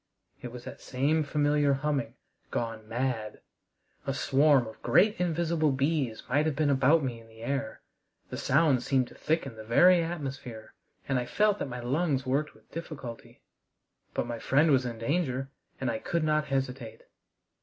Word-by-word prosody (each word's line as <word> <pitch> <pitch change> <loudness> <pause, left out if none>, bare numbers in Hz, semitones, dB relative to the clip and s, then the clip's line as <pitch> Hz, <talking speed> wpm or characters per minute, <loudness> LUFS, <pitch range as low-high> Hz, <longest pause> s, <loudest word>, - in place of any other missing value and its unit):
It 125 - -6
was 125 0 -9
that - - -9
same 140 +5 +1
familiar 145 -1 +2
humming 145 +1 -1 0.3
gone 115 -2 -3
mad! 115 -3 -2 0.7
A 135 - 0
swarm 140 -2 +4
of 110 - -11
great 210 +1 +4
invisible 165 -3 +1
bees 135 -4 0
might 145 +5 +2
have 155 - -1
been 150 -1 +2
about 140 +4 +4
me 120 -3 -3
in 115 - -16
the 110 0 -16
air. 140 +2 -3 0.5
The - - -4
sound 145 -7 +3
seemed 130 -1 +1
to - - -14
thicken 155 -6 -1
the 110 - -8
very 175 +11 +5
atmosphere, 135 -9 -6 0.3
and 135 -2 +1
I 120 - -4
felt 210 -1 +2
that - - -3
my 125 -1 -5
lungs 135 +1 0
worked 140 +4 -1
with - - -24
difficulty. 145 -8 -8 0.7
But - - 0
my 120 -1 -5
friend 150 +7 +3
was 130 -2 +3
in 115 -1 -5
danger, 135 +1 -1 0.3
and 130 -3 0
I 110 - -3
could 170 -2 -1
not 155 0 +2
hesitate. 130 -4 -3
135 Hz, 170 wpm, -29 LUFS, 125-155 Hz, 0.7 s, very